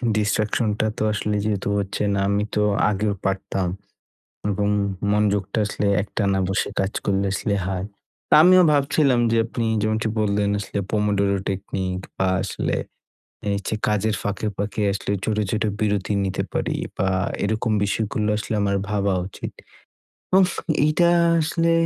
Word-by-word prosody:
distraction 110 +1 +1
টা 110 - +2
তো - - -1
আসলে 105 0 -1
যেহেতু 100 -2 -1
হচ্ছে 100 0 -2
না 100 - 0
আমি 100 +1 +1
তো 105 - +2 0.3
আগেও 105 0 0
পারতাম, 95 -1 -1 0.8
এবং 100 +1 0 0.4
মনযোগটা 105 0 +1
আসলে 105 - -2 0.2
একটানা 100 -1 0
বসে 95 - 0
কাজ 95 +2 -1
করলে 100 0 +1
আসলে 100 +1 -1
হয়। 95 -1 -2 0.4
তো - - -16
আমিও 185 +1 +7
ভাবছিলাম 140 -2 +3
যে 115 - +2
আপনি 115 0 -3 0.2
যেমনটি 110 +1 0
বললেন 100 -1 +1
আসলে 100 0 -4
Pomodoro 100 -2 +1
technique 95 -1 -3
বা 95 - +1 0.2
আসলে 100 - -2 0.7
এ - - 0
হচ্ছে 100 +2 -3
কাজের 105 0 +1
ফাঁকে, 100 +1 -2
ফাঁকে 105 +1 -3
আসলে 100 0 -4
ছোট, 110 -1 0
ছোট 110 - 0 0.2
বিরতি 105 -1 0
নিতে 95 - -1
পারি - - -1 0.2
বা 95 - +1 0.4
এরকম 110 +2 0
বিষয়গুলো 105 +1 -1
আসলে 105 +1 -3
আমার 100 0 +1
ভাবা 100 -2 +1
উচিৎ। - - -7 0.9
উফ 185 -2 +4 0.3
এইটা 170 +3 +3 0.3
আসলে 165 +2 +1
105 Hz, 145 wpm, -23 LUFS, 100-110 Hz, 0.9 s, আমিও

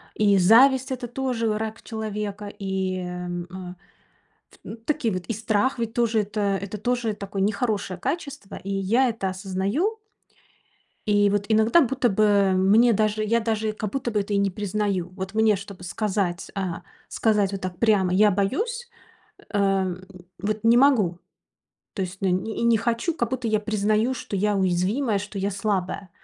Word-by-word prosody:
и 205 -2 +4
зависть- 255 +8 +5
это 250 -1 -3
тоже 245 -2 -2
враг 220 +1 -3
человека, 210 -2 -5
и, 190 -2 -3
эм, 180 -1 -5
э, 185 +1 -10 0.8
ф 225 0 -13
такие 295 -7 0
вот. 185 -1 -5
И - - -2
страх 220 +4 0
ведь 230 0 -3
тоже- 230 -2 +2
это 210 +1 -3 0.2
это 200 +1 -5
тоже 240 0 -1
такое 200 -1 -4
нехорошее 200 -2 -1
качество, 280 - -4
и 195 - -7
я 200 +7 +2
это 220 -5 -2
осознаю. 200 - -1 1.1
И 205 -1 +4
вот 205 0 0
иногда, 220 +9 +5
будто 265 -2 +1
бы, 200 -2 +3
мне 210 +6 +5
даже 215 0 +1
я 230 +2 +2
даже, 220 -1 -1
как 215 -1 -4
будто 260 -1 -2
бы, 210 -3 0
это 200 +1 -4
и - - +2
не 200 0 +2
признаю. 200 -2 -2
Вот 190 +1 -6
мне, 220 -1 +4
чтобы 195 -1 -9
сказать 190 -1 -2
э, - - -2 0.5
сказать 210 -3 +1
вот 195 -1 -5
так 185 -1 -5
прямо: 200 -4 +3
"Я 205 +3 +5
боюсь", 445 - -1 0.6
эм, 195 -3 0 0.4
вот 210 +3 -3
не 230 +1 +6
могу. 235 -10 +4 0.8
То 195 - -2
есть, 185 +1 -6
но 195 - +1
и - - +2 0.3
не 235 -1 +4
хочу, 235 +8 0
как 235 -7 -2
будто 255 -3 -2
я 215 -1 +2
признаю, 215 +3 +1
что 210 - -5
я 210 +2 +1
уязвимая, 195 +5 +1
что 205 +1 -8
я 195 +1 -1
слабая. 195 -1 -2
210 Hz, 165 wpm, -24 LUFS, 195-230 Hz, 1.1 s, не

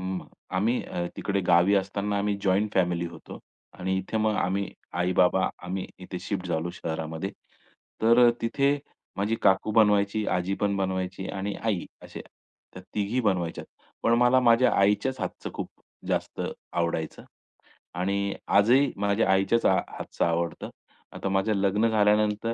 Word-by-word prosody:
अं, 95 0 -4 0.3
आम्ही 115 +6 +1
अ, 85 0 -4
तिकडे 100 -1 -1
गावी 90 +3 +5
असताना 100 +1 -1
आम्ही 100 0 0
जॉइंट 100 +2 +1
फॅमिली 85 -2 +1
होतो 85 -1 -10 0.4
आणि 95 +1 -1
इथे 95 +4 -4
मग 110 0 +1
आम्ही 95 +2 0 0.3
आई-बाबा 90 +1 +3
आम्ही 90 +1 -4
इथे 90 0 -6
शिफ्ट 95 0 -4
झालो 85 0 -2
शहरामध्ये. 80 +1 -4 0.7
तर 115 +2 +5
अ, - - +7
तिथे 140 +5 +1 0.4
माझी 105 +3 0
काकू 95 +2 +3
बनवायची, 105 -1 +3
आजी 90 +2 0
पण 100 -1 +1
बनवायची 95 0 -2
आणि 100 +1 -3
आई. 105 -6 0 0.2
असे - - -9
अ, - - -13 0.4
त्या 95 - -10
तिघी 105 +4 0
बनवायच्यात. 90 -7 -1 0.4
पण 115 - +3
मला 125 +1 +5
माझ्या 120 +1 +4
आईच्याच 105 +7 +2
हातचं - - -5
खूप - - -4 0.4
जास्त - - -2 0.3
आवडायचं 85 -2 -2 0.8
आणि 100 +2 0 0.2
आजही 125 +7 +4
माझ्या 100 +1 +1
आईच्याच 95 +5 +2
हा - - +5
हातचं - - -3
आवडतं. 85 0 -2 0.4
आता 95 - -4
माझं 95 +3 +1
लग्न 100 +3 +2
झाल्यानंतर 105 +1 +2
100 Hz, 145 wpm, -26 LUFS, 90-110 Hz, 0.8 s, अ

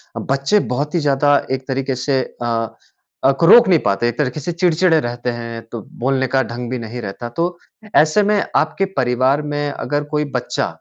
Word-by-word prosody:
अ, - - -3
बच्चे 140 +10 +1
बहुत 145 +4 -2
ही - - +3
ज़्यादा 145 -1 +3
एक 130 0 -3
तरीके 135 0 -2
से 135 -2 +2 0.2
अ, 115 -1 -2 0.5
अक 135 +4 +2
रोक 235 +8 +8
नहीं 175 -4 +4
पाते, 100 +3 +1
एक 120 - -6
तरीके 150 +1 -1
से 160 +5 -3
चिड़चिड़े 170 -1 +3
रहते 120 +1 -3
हैं 115 -1 -6
तो 115 -2 -5 0.2
बोलने 130 +1 +1
का 135 +1 +2
ढंग 120 0 -6
भी 130 - -2
नहीं 115 +2 -6
रहता 115 +3 -6
तो 175 +1 -1 0.4
ऐसे 155 +7 +4
में 205 0 +2
आपके 160 +5 +1
परिवार 130 +2 +2
में 145 0 -1
अगर 145 +1 -2
कोई 150 0 0
बच्चा 125 0 -1
135 Hz, 195 wpm, -19 LUFS, 120-155 Hz, 0.5 s, रोक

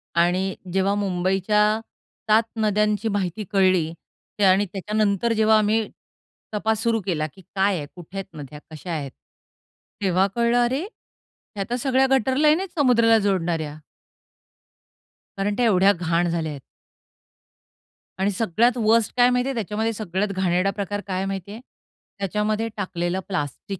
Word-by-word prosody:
आणि 180 +3 +1 0.2
जेव्हा 195 +1 +2
मुंबईच्या 200 +2 +1 0.5
7 220 +2 +5
नद्यांची 210 -1 +1
माहिती 200 0 -2
कळली. 185 -5 +3 0.5
त्या 200 -2 +4
आणि 195 +2 +3
त्याच्यानंतर 210 +2 0
जेव्हा 220 0 +4
आम्ही 215 +1 +1 0.7
तपास 220 +1 0
सुरू 230 -2 +1
केला, 155 -5 -1
की 190 - -16
काय 195 0 +2
आहे? 145 - -5
कुठे 180 +2 -10
आहेत 190 -3 -7
नद्या? 145 0 -9
कशा 160 +3 -7
आहेत? 145 -5 -4 0.9
तेव्हा 190 0 +2
कळलं 235 0 +2
"अरे, 260 +5 -1 0.7
ह्या 200 - -2
तर 240 - 0
सगळ्या 260 +1 +2
गटर 265 0 +2
लाईन 305 +3 +4
आहेत 365 -3 -6
समुद्राला 235 -4 +5
जोडणाऱ्या." 165 -6 -1 1.6
कारण 205 +1 -1
त्या 245 - +2
एवढ्या 195 -2 +5
घाण 175 0 0
झाल्या 165 -2 -2
आहेत. 140 - -8 1.6
आणि 195 +2 +1
सगळ्यात 225 +5 +1
वर्स्ट 225 -1 +2
काय 245 0 +6
माहिती 250 +1 +1
आहे - - -1
त्याच्यामध्ये? 220 +1 -2
सगळ्यात 200 -1 -2
घाणेरडा 185 +1 +1
प्रकार 205 +1 -2
काय 185 -1 -2
आहे 190 - -1
माहिती 195 0 -5
आहे? 225 - -9 0.6
त्याच्यामध्ये 210 +3 -1
टाकलेलं 185 -2 -2
प्लास्टिक, 180 +2 -4
200 Hz, 145 wpm, -23 LUFS, 185-220 Hz, 1.6 s, काय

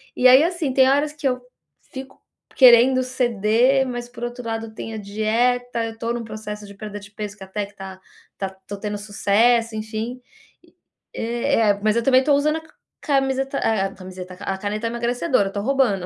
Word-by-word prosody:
e 255 - +5
aí 260 +4 +8
assim 340 -5 -1
tem 260 0 +5
horas 290 +2 +2
que 300 -2 -2
eu 250 -1 -1 0.5
fico 265 0 -9 0.3
querendo 255 0 +7
ceder, 250 +1 +2
mas 240 -1 -5
por 240 -1 -10
outro 240 0 -7
lado 225 -1 -4
tem 225 +1 -7
a - - -5
dieta, 230 +4 0
eu 225 0 -7
tô 230 +1 -2
num 240 -1 -4
processo 210 -1 -7
de 200 - -11
perda 205 0 -7
de 200 +1 -13
peso 210 -1 -6
que 195 - -10
até 200 +1 -3
que 205 - -18
tá 190 -1 -9 0.4
tá 195 -1 -3 0.2
tô 205 +1 -6
tendo 210 0 -4
sucesso, 220 +3 +2
enfim, 220 +3 -4 0.9
eh 235 +1 -1
eh 215 -2 +4
eh, 200 - -2
mas 215 +1 +2
eu 235 - +1
também 260 +1 +5
tô 290 +1 +3
usando 305 +2 +2
a 320 - -6 0.4
camiseta 270 -1 0
eh, 200 -4 0
camiseta 185 -1 -9 0.2
a - - -5
caneta 210 +3 -3
emagrecedora, 235 0 0
eu - - -13
tô 200 - -2
roubando, 235 -7 +1
230 Hz, 195 wpm, -22 LUFS, 210-255 Hz, 0.9 s, aí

